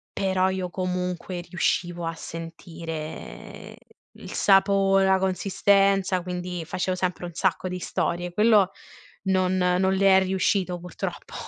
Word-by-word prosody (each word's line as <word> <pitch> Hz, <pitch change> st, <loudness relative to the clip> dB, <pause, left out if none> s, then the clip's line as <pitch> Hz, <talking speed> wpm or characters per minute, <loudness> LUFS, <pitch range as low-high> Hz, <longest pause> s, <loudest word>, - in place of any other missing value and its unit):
però 190 Hz, -1 st, +1 dB
io 185 Hz, -1 st, -3 dB
comunque 180 Hz, -1 st, -3 dB
riuscivo 175 Hz, -1 st, -1 dB
a 165 Hz, -, -2 dB
sentire 165 Hz, -1 st, -8 dB, 0.4 s
il -, -, -10 dB
sapo 195 Hz, 0 st, +4 dB
la 190 Hz, 0 st, +4 dB
consistenza, 195 Hz, 0 st, +2 dB
quindi 180 Hz, -1 st, -5 dB
facevo 185 Hz, +3 st, -2 dB
sempre 180 Hz, -1 st, -2 dB
un 175 Hz, -, -8 dB
sacco 185 Hz, +1 st, 0 dB
di 180 Hz, 0 st, -4 dB
storie, 175 Hz, 0 st, -2 dB
quello 210 Hz, -1 st, +4 dB, 0.5 s
non 185 Hz, -1 st, +1 dB
non 180 Hz, +1 st, +2 dB
le 195 Hz, 0 st, +5 dB
è 190 Hz, -, +4 dB
riuscito 185 Hz, -1 st, 0 dB
purtroppo. 175 Hz, -1 st, -6 dB
185 Hz, 125 wpm, -25 LUFS, 175-190 Hz, 0.5 s, le